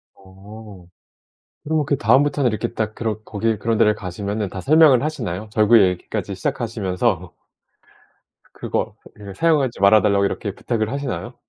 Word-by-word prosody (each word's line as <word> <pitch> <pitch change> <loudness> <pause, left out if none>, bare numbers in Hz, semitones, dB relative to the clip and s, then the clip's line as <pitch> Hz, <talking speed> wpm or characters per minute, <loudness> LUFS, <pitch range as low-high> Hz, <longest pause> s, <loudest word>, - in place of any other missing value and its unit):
어. 95 0 -14 0.8
그러면 155 -1 0
그 140 - 0
다음부터는 135 +4 +2
이렇게 110 +1 -3
딱 110 -1 -3
그런 110 -2 -3
거기 110 +1 -1
그런 110 +2 -1
데를 105 -1 +3
가시면은 100 +2 -4
다 95 - -7
설명을 150 -3 +5
하시나요? 110 - -4
절구 110 +2 +5
얘기까지 90 -2 -2
시작하시면서. 90 -1 -2 1.2
그거 - - -3 0.2
그 100 -2 -10
사용하지 140 - +1
말아 100 +2 +5
달라고 100 -1 +2
이렇게 100 0 -3
부탁을 110 -1 -2
하시나요? 135 -3 -5
110 Hz, 355 characters per minute, -21 LUFS, 100-125 Hz, 1.2 s, 설명을